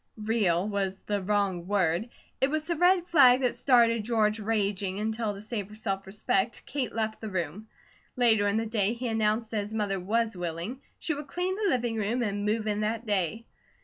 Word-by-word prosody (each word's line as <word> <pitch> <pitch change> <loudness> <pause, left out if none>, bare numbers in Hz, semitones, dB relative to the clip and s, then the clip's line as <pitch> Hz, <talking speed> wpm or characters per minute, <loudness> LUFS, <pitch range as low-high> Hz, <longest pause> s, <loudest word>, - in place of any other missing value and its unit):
"Real," 210 -5 +1
was 195 -2 -2
the 205 -1 -2
wrong 190 -3 0
word. 195 +1 +1 0.3
It 265 - +3
was 310 +1 -1
the 340 - -1
red 355 +2 +4
rag 255 -4 +7
that 250 -2 +1
started 235 -3 +3
George 215 -1 +1
raging, 200 -3 -1
until 220 -1 -2
to 200 - -8
save 210 -2 -4
her 210 - -11
self 195 -3 -3
respect, 200 +2 -1
Kate 265 -3 -3
left 220 -1 -2
the 220 - -5
room. 185 +3 -4 0.5
Later 225 -4 +4
in 200 +2 +1
the 225 - 0
day 215 -1 +1
he 245 +1 -4
announced 220 0 0
that 220 - 0
his 210 +2 -6
mother 200 -3 0
was 220 +4 0
willing, 175 +9 -4 0.2
she 330 - -2
would 290 0 -6
clean 360 +6 -2
the 415 -1 0
living 240 -5 0
room 225 +4 0
and 205 -2 -2
move 215 +1 0
in 210 -1 -1
that 225 +2 -2
day. 205 +1 0
215 Hz, 200 wpm, -28 LUFS, 200-235 Hz, 0.5 s, rag